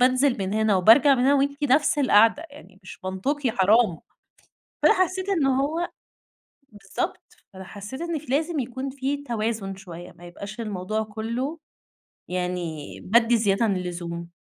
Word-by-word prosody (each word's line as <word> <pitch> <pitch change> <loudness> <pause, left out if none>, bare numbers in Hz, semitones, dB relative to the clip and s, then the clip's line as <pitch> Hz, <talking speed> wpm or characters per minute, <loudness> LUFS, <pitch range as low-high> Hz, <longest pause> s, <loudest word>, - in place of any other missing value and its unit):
بانزل 255 0 +3
من 190 0 -2
هنا 220 -2 +2
وبارجع 240 +9 +6
من 245 - 0
هنا 280 +2 +5
وأنتِ 280 +1 0
نفس 285 +2 +3
القعدة، 255 +3 +4
يعني 285 -9 -15
مش 185 - -12
منطقي 245 +9 -1
حرام 205 -3 +3 0.8
فأنا - - +6
حسّيت 370 0 0
إنه 270 -8 +2
هو 325 +5 -1 0.8
بالضبط 200 -4 -5 0.3
فأنا 190 0 -10
حسّيت 205 +7 -9
إن 340 -2 -2
في 300 - -15
لازم 315 +3 0
يكون 260 +1 -4
في 275 +1 -2
توازن 220 -6 -3
شوية، 175 -2 -10
ما 175 0 -16
يبقاش 200 +6 -9
الموضوع 210 0 -3
كلّه 230 +8 -4 0.7
يعني 180 -4 -4
بادّي 235 +3 +4
زيادة 210 0 +2
عن 200 -4 +1
اللزوم. 170 -1 -5
230 Hz, 150 wpm, -24 LUFS, 190-280 Hz, 0.8 s, وبارجع